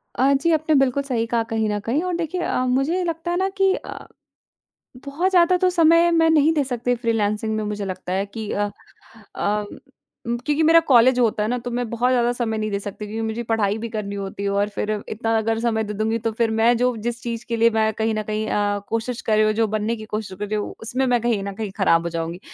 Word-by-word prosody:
अ, 270 +3 +3
जी। 275 +5 +2
आपने 315 0 +2
बिल्कुल 270 0 +2
सही 245 -5 -1
कहा 230 0 0
कहीं 220 -1 0
न 210 0 -1
कहीं 235 +9 -1
और 365 -1 -2
देखिए 345 +1 -3
अ, 255 - 0
मुझे 270 +9 +1
लगता 335 0 -3
है 350 - 0
ना 380 - +1
कि 385 0 +4
अ, - - -9 1.0
बहुत 315 +7 -1
ज़्यादा 360 0 +4
तो 370 0 +2
समय 335 0 +5
मैं 325 -1 +4
नहीं 310 0 +4
दे 295 -3 +1
सकती 245 -1 -1
फ्रीलांसिंग 220 -2 -1
में 215 - -1
मुझे 210 -1 -3
लगता 185 -1 -5
है 195 +1 0
कि 215 +1 -7
अ 205 0 -1 0.7
अ, 210 +1 0 0.6
क्योंकि 260 +7 -1
मेरा 330 +1 +6
कॉलेज 250 -1 +5
होता 220 -3 +2
है 215 - 0
ना, 245 - 0
तो 245 0 -6
मैं 245 0 -2
बहुत 240 +2 +1
ज़्यादा 240 -1 +2
समय 230 -3 -2
नहीं 215 0 -2
दे 200 - -1
सकती 210 +1 -7
क्योंकि 220 +2 -5
मुझे 220 +2 -3
पढ़ाई 215 -3 0
भी 230 +1 -5
करनी 210 -3 -4
होती 195 0 -5
है 200 - 0
और 200 +1 +1
फिर 210 +1 -3 0.2
इतना 225 +1 -1
अगर 225 0 0
समय 225 -2 0
दे 210 0 -5
दूँगी 220 +2 0
तो 225 - +1
फिर 230 -1 +2
मैं 225 +2 +3
जो 250 0 +1
जिस 240 0 -3
चीज़ 235 -1 -4
के 230 - -1
लिए 230 +1 +4
मैं 220 -1 +1
कहीं 220 +1 0
न 215 - -1
कहीं 215 +1 -3
अ, 205 0 0
कोशिश 230 +2 -2
कर 215 -1 +1
रही 215 - +4
हूँ 215 - +2
जो 225 +1 +2
बनने 215 +2 -1
की 215 - -9
कोशिश 210 -3 -5
कर 210 - -3
रही 210 - -3
हूँ 210 - -4
उसमें 255 +4 -1
मैं 245 -1 +2
कहीं 225 -4 0
न 200 0 -5
कहीं 210 0 -4
ख़राब 165 -4 +3
हो 170 - -3
जाऊँगी। 165 +1 -4
230 Hz, 250 wpm, -22 LUFS, 210-260 Hz, 1.0 s, मेरा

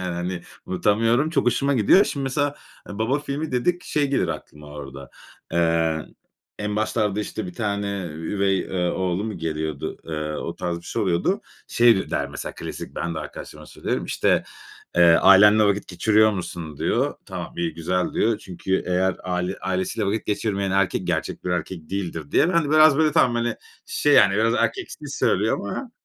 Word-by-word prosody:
yani 90 -2 -3
hani. 90 +1 -3 0.3
Unutamıyorum. 115 - +2
Çok 165 - 0
hoşuma 140 +3 +2
gidiyor. 130 - +5
Şimdi 140 -2 -3
mesela 145 +2 0 0.4
e, 100 - -7
"Baba 125 +6 +1
filmi" 145 +1 -4
dedik. 175 +9 0
Şey 145 -2 0
gelir 90 -10 +1
aklıma 75 -1 -7
orada: 70 -2 -9 0.4
Eee, 80 -2 +1 0.5
en 105 0 -2
başlarda, 105 -1 0
işte, 105 -1 -5
bir 90 - -7
tane 100 -2 -2 0.3
üvey, 95 +5 0
eee, 90 -2 -1
oğlu 95 +2 -1
mu 105 -5 -5
geliyordu? 80 -2 -3
Eee, 75 -1 -4
o - - -5
tarz 85 -1 -2
bir - - -15
şey 115 - -3
oluyordu. 85 -4 +1 0.3
Şey 115 -5 +4
der - - -1
mesela - - -6
klasik, - - -7
ben 85 0 -2
de 80 - -3
arkadaşlarıma 75 -1 -9
söylüyorum, - - -3
işte, - - +1 0.5
eee, 85 - +6
"Ailenle 100 +5 +7
vakit 100 0 +1
geçiriyor 110 +4 +3
musun?" 85 -5 -6
diyor. - - 0
"Tamam, - - -6
iyi, 85 -2 -2
güzel." 90 +2 -1
diyor. 110 -2 +1
"Çünkü 95 -1 -2
eğer 90 +1 +1
aile 90 +1 -2
ailesiyle 95 +2 -2
vakit 110 +3 -2
geçirmeyen 100 -2 -1
erkek 95 0 +1
gerçek - - -2
bir 90 - -2
erkek 90 -1 -4
değildir." 85 -6 -4
diye. 170 - +4
Ben 170 -2 +3
de 145 - -3
biraz, 155 -2 +6
böyle, 155 -2 +3
tamam, 120 -2 +4
hani, 120 -1 -1 0.3
şey 145 - +1
yani 95 - +6
biraz 115 +2 +2
erkeksi 385 - -1
söylüyor - - +1
ama 255 -3 -5
95 Hz, 175 wpm, -23 LUFS, 85-115 Hz, 0.5 s, Ailenle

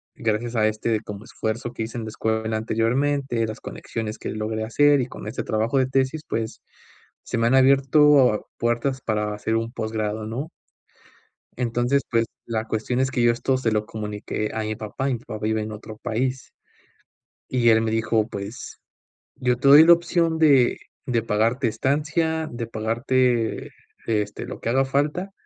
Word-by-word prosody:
gracias 115 +2 -2
a 110 -1 +3
este 110 0 -1
como 105 0 -8
esfuerzo 120 0 -4
que 115 - -3
hice 115 +2 -6
en 115 - -4
la - - -5
escuela 110 0 -1
anteriormente, 120 +3 0
las 110 0 -6
conexiones 110 -2 -5
que - - -5
logré 110 +1 -3
hacer, 145 +4 +4
y 125 - -2
con 105 - -9
este 105 - -4
trabajo 110 +4 0
de 130 - +2
tesis, 135 +3 0
pues, 110 0 -3 0.6
se 125 - -3
me 115 0 +2
han 125 - +3
abierto 135 -2 +5
puertas 120 +3 0
para 105 -2 -1
hacer 110 +2 -2
un 115 +1 -3
posgrado, 110 -2 -3
¿no? 130 +8 -4 1.1
Entonces, 120 +3 +1
pues, 115 -1 +2 0.2
la 110 -1 -2
cuestión 115 +3 -2
es 130 -1 +1
que 120 - 0
yo 120 - +5
esto 130 +3 0
se 130 -3 0
lo 105 -1 0
comuniqué 105 0 -4
a 110 0 -2
mi 110 0 -2
papá, 110 +6 -3
y 135 - +1
mi 120 - -5
papá 115 -3 -7
vive 110 0 0
en 105 - -5
otro 110 +1 -9
país. 125 +4 -2 1.0
Y 120 -2 +2
él 110 -1 +5
me 110 - 0
dijo: 110 -1 +1
"Pues, 100 +4 -7 0.6
yo 125 -2 +1
te 135 +2 +2
doy 145 +3 +10
la 170 - +8
opción 170 -1 +2
de 140 -6 +4 0.3
de 120 -3 +1
pagarte 115 +4 +1
estancia, 155 +7 0
de 120 -1 -4
pagarte, 115 +1 0 0.4
este, 105 -2 -1
lo - - -8
que - - -3
haga 135 +3 +3
falta, 150 +8 -1
115 Hz, 175 wpm, -23 LUFS, 110-130 Hz, 1.1 s, doy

